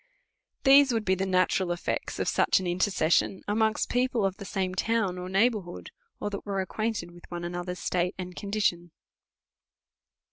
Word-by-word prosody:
These 275 0 +7
would 225 -2 -1
be 190 - +3
the 190 +1 -1
natural 185 0 +2
effects 175 - -3
of - - -2
such - - +3
an 190 - -5
intercession 180 0 +1
amongst 220 +1 +1
people 245 -3 +1
of 195 -1 -1
the 200 - -8
same 190 -1 -2
town 195 -2 0
or 180 0 -6
neighbourhood, 195 -2 0 0.3
or 205 - -3
that 200 - -5
were 200 -2 -2
acquainted 205 -1 -2
with 175 0 -16
one 175 -1 -5
another's 175 +1 -4
state 180 +1 -1
and 180 -1 -6
condition. 200 -4 -1
190 Hz, 165 wpm, -28 LUFS, 180-215 Hz, 0.3 s, These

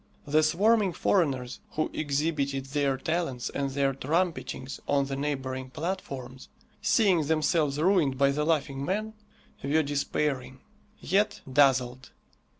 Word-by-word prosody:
The 155 +1 +3
swarming 195 +5 +3
foreigners 135 -12 0
who 155 - -1
exhibited 140 -2 -1
their 135 -1 0
talents 155 -4 -2
and 140 -1 -2
their 135 0 +1
trumpetings 150 -1 -2
on 140 -1 +2
the 135 0 -4
neighbouring 130 -2 -3
platforms, 135 -5 -5 0.3
seeing 185 -9 +3
themselves 155 -2 +1
ruined 160 -5 +2
by 140 +1 +4
the 150 +2 -1
Laughing 145 -4 0
Man, 215 +7 -2 0.5
were 155 +3 +2
despairing, 140 -2 -2 0.4
yet 205 +2 +1
dazzled. 130 -2 +3
145 Hz, 120 wpm, -28 LUFS, 135-165 Hz, 0.5 s, by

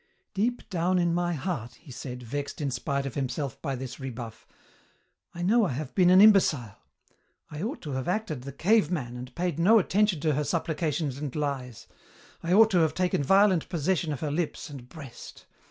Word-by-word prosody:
"Deep 235 +5 -1
down 180 +1 +1
in 175 -1 +2
my 175 0 0
heart," 130 - -4
he 145 - -15
said, 125 0 -7
vexed 140 +4 -5
in 140 -3 -1
spite 140 +2 -2
of 135 - -4
himself 135 0 -3
by 140 -4 -2
this 130 -1 -7
rebuff, 120 -4 -7 0.9
"I 175 - -4
know 225 +6 +4
I 145 - -2
have 140 +1 -5
been 180 -2 +4
an 185 +1 +7
imbecile. 155 - +5 0.8
I 150 +1 -6
ought 230 - -4
to 150 - -5
have 130 -1 -3
acted 180 - -2
the 140 +2 -7
cave 205 +10 +2
man 130 -9 -3
and 125 +1 -9
paid 175 -3 -2
no 210 +7 +6
attention 205 -2 +2
to 155 -1 +2
her 150 +2 0
supplications 155 -2 -2
and 145 -3 -5
lies. 135 -6 -3 0.6
I 170 - -3
ought 220 +3 +6
to 180 - +4
have 160 -2 +2
taken 180 -4 +1
violent 195 +2 +4
possession 170 -1 0
of 145 - -4
her 150 -2 -2
lips 160 0 -3
and 125 -3 -10
breast. 140 -6 -11
155 Hz, 195 wpm, -27 LUFS, 135-180 Hz, 0.9 s, an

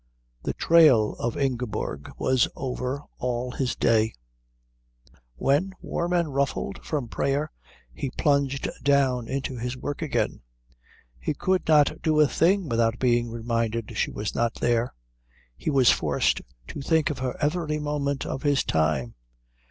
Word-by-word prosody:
The - - -2
trail 150 -10 +5
of 120 -1 -2
Ingeborg 125 - -2
was 130 -2 +2
over 130 +1 -3 0.2
all 125 0 -2
his 125 -1 -2
day. 110 -2 +2 1.2
When, 145 - +1
warm 170 +1 -3
and 170 -5 +1
ruffled 140 0 -2
from 145 -6 -2
prayer, 140 +5 -1 0.4
he 140 - -3
plunged 140 0 +1
down 135 -4 +2
into 135 -1 -3
his 125 +2 -4
work 145 +2 -5
again, - - -1 0.8
he 145 - -2
could 185 +5 0
not 155 +1 +4
do 155 -2 +2
a 150 - +6
thing 180 +5 +2
without 115 -2 +1
being 120 -2 +2
reminded 115 -1 -2
she - - 0
was 105 0 -4
not 115 -1 0
there. 120 0 +1 0.6
He - - -3
was 135 -4 +5
forced - - +1 0.3
to - - -6
think 160 +2 +2
of 145 - -6
her 130 -1 -3
every 150 0 0
moment 145 -2 -2
of 135 - -4
his 145 -2 +2
time. 75 -6 0
135 Hz, 145 wpm, -26 LUFS, 120-150 Hz, 1.2 s, a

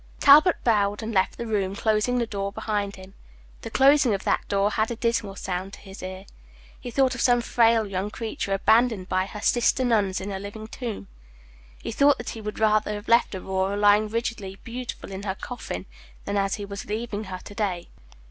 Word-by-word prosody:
Talbot 305 +6 +7
bowed, 205 -2 +1
and 220 +1 -4
left 190 -1 +1
the 235 - -4
room, 200 -3 -1
closing 220 +4 +1
the 240 - +1
door 200 -2 -4
behind 205 -1 -2
him. 190 0 -13 0.5
The - - -6
closing 270 -4 +4
of 195 - -6
that - - +1
door 200 +1 +1
had 220 0 0
a 235 - -3
dismal 230 -4 -1
sound 190 +1 -4
to - - -10
his 195 -1 -11
ear. 185 +1 -7 0.5
He 245 - -7
thought 260 +1 +2
of 250 - -4
some 245 -1 +4
frail 230 -1 +3
young 195 0 -3
creature 220 -2 -4
abandoned 220 0 +2
by 185 +1 +1
her 210 +1 -8
sister 245 +3 +2
nuns 205 -6 +1
in 195 +2 -5
a 190 - -4
living 205 +2 -8
tomb. 225 - -6 0.8
He - - -4
thought 280 -1 +4
that - - -6
he 225 - -8
would 210 0 -5
rather 215 -1 +2
have 205 +2 -8
left 235 -3 +3
Aurora 190 +1 -2
lying 205 +1 +4
rigidly 225 -4 -3
beautiful 245 -3 -7
in 190 0 -6
her 195 -2 -3
coffin 210 - -6 0.4
than 200 - -2
as 195 -1 +1
he 205 - -6
was 200 0 -7
leaving 215 0 -4
her 185 -1 -6
to 205 - -12
day. 190 -5 -2
210 Hz, 205 wpm, -25 LUFS, 195-230 Hz, 0.8 s, Talbot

